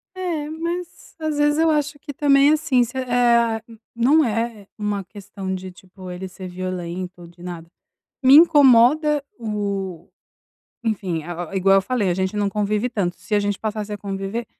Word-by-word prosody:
É, 340 -5 -3
mas 340 +2 -6
às 310 -2 -2
vezes 295 +1 +2
eu 325 0 +4
acho 295 -1 0
que 290 0 -8
também 280 0 +4
assim, 295 -5 +2
se, 240 - -9
eh 235 -3 +2 0.3
Não 265 +7 +4
é 225 -2 -2
uma 210 -1 -2
questão 195 -1 -7
de, 185 0 -6
tipo, 185 0 -12
ele 180 +1 -6
ser 185 0 -9
violento, 180 -1 -5
de 175 +1 -17
nada. 175 -2 -7 0.6
Me 265 +2 +8
incomoda 295 -1 +6
o 200 -6 -4 0.7
enfim, 190 -8 -2
a 175 - -7
a 175 -1 -6
a, - - -6
igual 195 +1 +4
eu 195 - +4
falei, 215 -2 -1
a - - +2
gente 190 +3 -2
não 205 - +1
convive 210 +3 -1
tanto. 190 -6 -2
Se 215 - -7
a - - +4
gente 205 -1 -2
passasse 215 -1 -4
a 210 - -3
conviver, 195 +3 -4
210 Hz, 175 wpm, -22 LUFS, 190-275 Hz, 0.7 s, Me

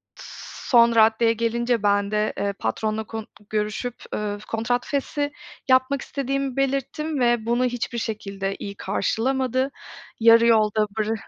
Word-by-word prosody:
s - - -10
son 235 -2 +6
raddeye 225 +1 +4
gelince, 235 0 0
ben 205 0 +2
de, 210 0 0
ııı, 200 0 -1
patronla 215 - -1
kon 220 0 -7 0.2
görüşüp, 215 +3 -2 0.2
ııı, 205 -1 -3
kontrat 240 +2 -1
feshi 285 +1 -2 0.4
yapmak 260 +2 +3
istediğimi 275 -1 -3
belirttim, 275 +3 -1
ve 240 -2 +2
bunu 240 +2 +1
hiçbir 245 -1 -3
şekilde 200 -3 -3
iyi 200 0 -6
karşılamadı. 260 +6 0 0.5
Yarı 230 0 +7
yolda 215 -2 +3
bıra 215 +1 0
230 Hz, 135 wpm, -23 LUFS, 215-255 Hz, 0.5 s, Yarı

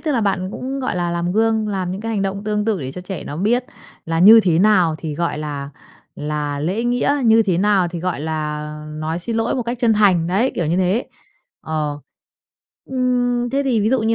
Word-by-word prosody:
tức 305 -2 -1
là 240 - +1
bạn 195 -3 0
cũng, 265 +2 -4
gọi 255 - -2
là, 175 -1 -1
làm 170 +1 -1
gương, 220 0 +1
làm 185 -3 -2
những 190 - -4
cái 225 +1 -4
hành 200 - 0
động 195 +1 -3
tương 210 0 -1
tự 215 -7 0
để 130 0 -5
cho 180 - -7
trẻ 185 0 -6
nó 145 - -6
biết 235 +7 +1 0.4
là 165 0 -1
như 220 +5 +9
thế 170 -3 +2
nào 185 -5 +4
thì 155 -3 -5
gọi 170 -1 -2
là 145 -2 -5 0.5
là 150 -1 -3
lễ 190 +10 -1
nghĩa, 245 +4 +1
như 225 0 +6
thế 185 -4 0
nào 195 -3 +3
thì 170 0 -6
gọi 180 -4 -2
là 155 -1 -3 0.4
nói 160 +2 -2
xin 225 +5 -4
lỗi 225 +1 0
một 250 - -1
cách 235 +1 -4
chân 230 -2 +4
thành, 190 -6 +3
đấy, 205 +9 +1
kiểu 170 - -1
như 165 - +1
thế, 190 +6 +1 0.5
ờ. 150 -2 -3 0.9
Ưm, 245 -2 0
thế 275 +2 +1
thì 245 -5 +1
ví 210 - +1
dụ 260 +1 +2
như 225 +1 +2
195 Hz, 230 wpm, -20 LUFS, 165-225 Hz, 0.9 s, như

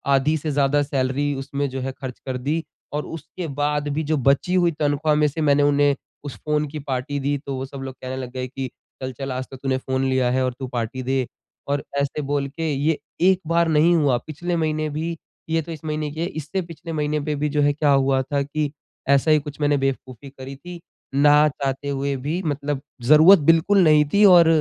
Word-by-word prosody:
आधी 150 +4 +2
से 155 0 -3
ज़्यादा 145 +1 +2
सैलरी 140 +1 -1
उसमें 140 +1 -3
जो 130 0 -5
है 135 - -3
ख़र्च 130 -2 -6
कर 130 -1 -3
दी 150 +6 -1 0.3
और 150 - -2
उसके 165 +2 -7
बाद 145 0 0
भी 155 +2 -1
जो 155 +1 0
बची 140 +8 +2
हुई 175 -2 +3
तनख़्वाह 150 +1 +1
में 150 0 +3
से 150 +3 -4
मैंने 145 -1 +4
उन्हें 145 -1 +3 0.3
उस 140 -5 -6
फ़ोन 150 0 +1
की 150 +2 -6
पार्टी 140 0 -3
दी। 140 +1 0
तो 140 -1 -6
वो 130 +1 -4
सब 135 0 -9
लोग 135 -1 -7
कहने 130 0 -5
लग 125 -2 -6
गए 130 0 -4
कि, 130 0 -5 0.3
"चल, 130 - -3
चल 135 +2 -5
आज 130 +1 -4
तो 135 - -8
तूने 130 0 -1
फ़ोन 130 0 -2
लिया 130 -1 +2
है 130 0 +1
और 125 - -1
तू 130 - -4
पार्टी 125 +1 -4
दे।" 130 -1 0 0.4
और 140 0 -1 0.2
ऐसे 140 +2 -1
बोल 140 0 -1
के 160 +2 -3
ये 145 +3 +1 0.2
एक 185 0 +4
बार 170 0 +2
नहीं 160 +3 +4
हुआ। 140 -6 +3
पिछले 175 +3 -3
महीने 155 -1 0
भी 160 +3 -3 0.3
ये 165 0 +1
तो 165 +2 -9
इस 160 - -8
महीने 150 -1 -2
की 155 - -8
है। - - +1
इससे 160 +3 -4
पिछले 165 -1 -9
महीने 150 0 0
पे 150 -1 -1
भी 150 +1 -1
जो 150 0 +1
है 145 0 +3
क्या 150 0 +2
हुआ 135 -1 +3
था 140 +2 -1
कि 145 0 -2 0.4
ऐसा 140 +3 +4
ही 155 - +5
कुछ 145 0 -9
मैंने 145 0 +3
बेवकूफ़ी 135 -1 -3
करी 135 0 -9
थी। 175 +5 -10 0.3
ना 150 +2 +5
चाहते 140 0 -3
हुए 140 0 -1
भी 150 +7 -3
मतलब 145 -2 -2 0.2
ज़रूरत 155 +9 +8
बिल्कुल 165 +5 +5
नहीं 155 -2 +6
थी 205 +1 +5
और 175 -4 +8
145 Hz, 225 wpm, -22 LUFS, 135-155 Hz, 0.4 s, ज़रूरत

